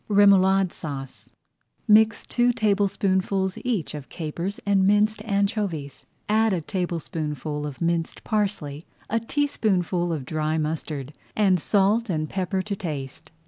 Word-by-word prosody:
REMOULADE 195 Hz, -2 st, +5 dB
SAUCE 135 Hz, -4 st, -7 dB, 0.6 s
Mix 220 Hz, +1 st, +5 dB
two 245 Hz, 0 st, +2 dB
tablespoonfuls 195 Hz, -3 st, +1 dB
each 225 Hz, -12 st, -1 dB
of 145 Hz, -3 st, -8 dB
capers 170 Hz, +4 st, -4 dB
and 195 Hz, -1 st, +3 dB
minced 210 Hz, +1 st, +3 dB
anchovies, 200 Hz, -, -2 dB, 0.2 s
add 220 Hz, 0 st, +3 dB
a 175 Hz, -, 0 dB
tablespoonful 155 Hz, -4 st, -3 dB
of 145 Hz, +1 st, -9 dB
minced 170 Hz, -1 st, -1 dB
parsley, 190 Hz, -9 st, -2 dB, 0.2 s
a 230 Hz, -, +2 dB
teaspoonful 200 Hz, -, 0 dB
of 150 Hz, -5 st, -3 dB
dry 155 Hz, +2 st, -1 dB
mustard, 150 Hz, -2 st, -3 dB, 0.2 s
and 195 Hz, -4 st, +3 dB
salt 205 Hz, +6 st, +2 dB
and 155 Hz, -3 st, -2 dB
pepper 190 Hz, 0 st, -1 dB
to 205 Hz, 0 st, -3 dB
taste. 145 Hz, -8 st, -6 dB
190 Hz, 125 wpm, -25 LUFS, 155-205 Hz, 0.6 s, REMOULADE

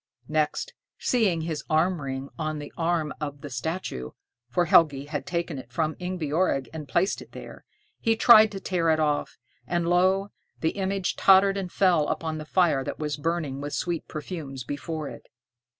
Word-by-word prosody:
Next, 155 Hz, -, 0 dB, 0.2 s
seeing 205 Hz, -10 st, +1 dB
his 160 Hz, -3 st, -3 dB
arm 165 Hz, +2 st, +2 dB
ring 135 Hz, 0 st, -4 dB
on 155 Hz, -1 st, -2 dB
the 145 Hz, -1 st, -8 dB
arm 165 Hz, -2 st, 0 dB
of 145 Hz, -1 st, -5 dB
the 145 Hz, -, -8 dB
statue, 125 Hz, -, -4 dB, 0.4 s
for 175 Hz, +8 st, +1 dB
Helgi 145 Hz, -4 st, +4 dB
had 145 Hz, -1 st, -5 dB
taken 170 Hz, -4 st, -2 dB
it 125 Hz, -1 st, -12 dB
from 155 Hz, +4 st, -1 dB
Ingebjorg 170 Hz, -5 st, 0 dB
and 155 Hz, -2 st, -6 dB
placed 175 Hz, +8 st, +1 dB
it -, -, -14 dB
there, -, -, -10 dB, 0.3 s
he 225 Hz, -1 st, +2 dB
tried 220 Hz, -2 st, +7 dB
to 195 Hz, -, -4 dB
tear 175 Hz, -4 st, 0 dB
it 160 Hz, 0 st, +3 dB
off, 150 Hz, -2 st, 0 dB, 0.3 s
and, 175 Hz, -1 st, 0 dB
lo! 190 Hz, +3 st, +3 dB, 0.3 s
the 160 Hz, -, +1 dB
image 195 Hz, -1 st, -2 dB
tottered 195 Hz, 0 st, +6 dB
and 190 Hz, -3 st, -4 dB
fell 175 Hz, -6 st, +3 dB
upon 160 Hz, -1 st, -2 dB
the 155 Hz, -, -7 dB
fire 160 Hz, -5 st, +2 dB
that -, -, -5 dB
was 150 Hz, -1 st, -2 dB
burning 150 Hz, -3 st, -2 dB
with 145 Hz, 0 st, -5 dB
sweet 175 Hz, -2 st, -2 dB
perfumes 150 Hz, -4 st, -6 dB
before 145 Hz, +4 st, -4 dB
it. -, -, -10 dB
160 Hz, 175 wpm, -26 LUFS, 145-180 Hz, 0.4 s, tried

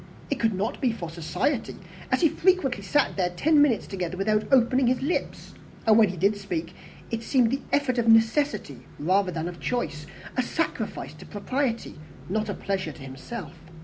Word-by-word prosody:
It -, -, 0 dB
could 225 Hz, -3 st, +1 dB
not 200 Hz, +4 st, -2 dB
be 255 Hz, -, +2 dB
for 170 Hz, -7 st, -6 dB
society, 175 Hz, -, -2 dB, 0.4 s
as -, -, +2 dB
he 325 Hz, -, +5 dB
frequently 320 Hz, -, +2 dB
sat 280 Hz, +7 st, +1 dB
there 180 Hz, -2 st, +1 dB
ten 290 Hz, -, +3 dB
minutes 265 Hz, -7 st, +3 dB
together 185 Hz, -2 st, -4 dB
without 215 Hz, +4 st, 0 dB
opening 255 Hz, 0 st, +4 dB
his 255 Hz, +1 st, +1 dB
lips; 320 Hz, +6 st, -3 dB, 0.3 s
and 220 Hz, -1 st, +6 dB
when 220 Hz, -2 st, +6 dB
he 180 Hz, -, -6 dB
did 200 Hz, +5 st, +3 dB
speak, 175 Hz, -5 st, -4 dB, 0.4 s
it 225 Hz, -1 st, -2 dB
seemed 235 Hz, -1 st, +2 dB
the 275 Hz, -, -1 dB
effect 265 Hz, -4 st, +1 dB
of 230 Hz, -, 0 dB
necessity 225 Hz, -, +3 dB, 0.2 s
rather 185 Hz, +4 st, +2 dB
than 165 Hz, -1 st, -3 dB
of 175 Hz, -1 st, -7 dB
choice 160 Hz, -12 st, -3 dB, 0.3 s
a 255 Hz, -, +2 dB
sacrifice 325 Hz, +6 st, -3 dB
to -, -, -13 dB
propriety, 235 Hz, -, -2 dB, 0.3 s
not 215 Hz, +2 st, -1 dB
a 200 Hz, -, -2 dB
pleasure 190 Hz, -5 st, -2 dB
to 145 Hz, -, -14 dB
himself. 145 Hz, -, -7 dB
220 Hz, 180 wpm, -26 LUFS, 185-255 Hz, 0.4 s, and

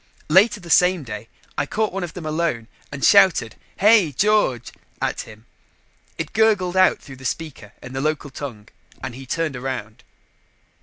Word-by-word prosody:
Later 205 Hz, +6 st, +5 dB
the 170 Hz, -3 st, -8 dB
same 180 Hz, -2 st, +4 dB
day, 110 Hz, -2 st, -8 dB, 0.3 s
I 145 Hz, -, -1 dB
caught 215 Hz, +3 st, -1 dB
one 195 Hz, -1 st, -3 dB
of 175 Hz, -, -7 dB
them 175 Hz, -3 st, -7 dB
alone 155 Hz, -7 st, -1 dB, 0.2 s
and 140 Hz, -1 st, -2 dB
shouted 185 Hz, -, +5 dB, 0.2 s
"Hey, 205 Hz, -5 st, +5 dB
George!" 145 Hz, -, +1 dB, 0.3 s
at -, -, -2 dB
him. 110 Hz, +1 st, -15 dB, 0.7 s
It 160 Hz, -2 st, -5 dB
gurgled 205 Hz, -5 st, +2 dB
out 185 Hz, 0 st, +4 dB
through 135 Hz, -3 st, -12 dB
the 130 Hz, -, -14 dB
speaker 130 Hz, -7 st, -5 dB
in 125 Hz, -, -9 dB
the 135 Hz, -, -3 dB
local 150 Hz, -1 st, -2 dB
tongue 120 Hz, -7 st, -8 dB, 0.3 s
and 130 Hz, -2 st, -5 dB
he 130 Hz, +2 st, -10 dB
turned 165 Hz, 0 st, -2 dB
around. 125 Hz, -4 st, -6 dB
155 Hz, 165 wpm, -22 LUFS, 125-185 Hz, 0.7 s, Later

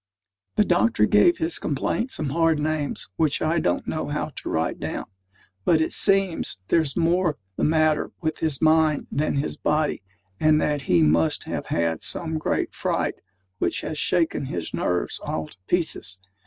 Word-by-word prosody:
The -, -, +4 dB
doctor 110 Hz, 0 st, +3 dB
gave 105 Hz, +12 st, +4 dB
his 160 Hz, 0 st, -1 dB
complaint 155 Hz, -, -1 dB
some 155 Hz, -, -2 dB
hard 165 Hz, 0 st, +2 dB
names 150 Hz, -1 st, -2 dB
which 155 Hz, -3 st, +2 dB
I 160 Hz, +2 st, +1 dB
don't 90 Hz, -, 0 dB
know -, -, -2 dB
how -, -, -2 dB
to -, -, -5 dB
write 80 Hz, 0 st, -1 dB
down; -, -, -4 dB, 0.6 s
but 160 Hz, -, +4 dB
it 160 Hz, -, 0 dB
seems 195 Hz, -, +2 dB
there's 155 Hz, -5 st, +2 dB
more 170 Hz, -1 st, +2 dB, 0.2 s
the -, -, -2 dB
matter 155 Hz, -1 st, +2 dB
with 160 Hz, -2 st, -2 dB
his 155 Hz, -2 st, -1 dB
mind 155 Hz, -1 st, +3 dB
than 150 Hz, +1 st, 0 dB
his 140 Hz, +1 st, -2 dB
body, 150 Hz, 0 st, 0 dB, 0.4 s
and 155 Hz, 0 st, +4 dB
that 150 Hz, -2 st, 0 dB
he 85 Hz, -2 st, +5 dB
must 80 Hz, +1 st, +2 dB
have -, -, -5 dB
had 85 Hz, -1 st, 0 dB
some 160 Hz, -2 st, -1 dB
great -, -, -1 dB
fright -, -, -1 dB, 0.4 s
which -, -, 0 dB
has 155 Hz, -, -4 dB
shaken 165 Hz, -5 st, +1 dB
his 85 Hz, -10 st, -4 dB
nerves 90 Hz, 0 st, -1 dB
all 80 Hz, -1 st, -3 dB
to -, -, -15 dB
pieces. 160 Hz, -, -1 dB
155 Hz, 170 wpm, -24 LUFS, 115-160 Hz, 0.6 s, he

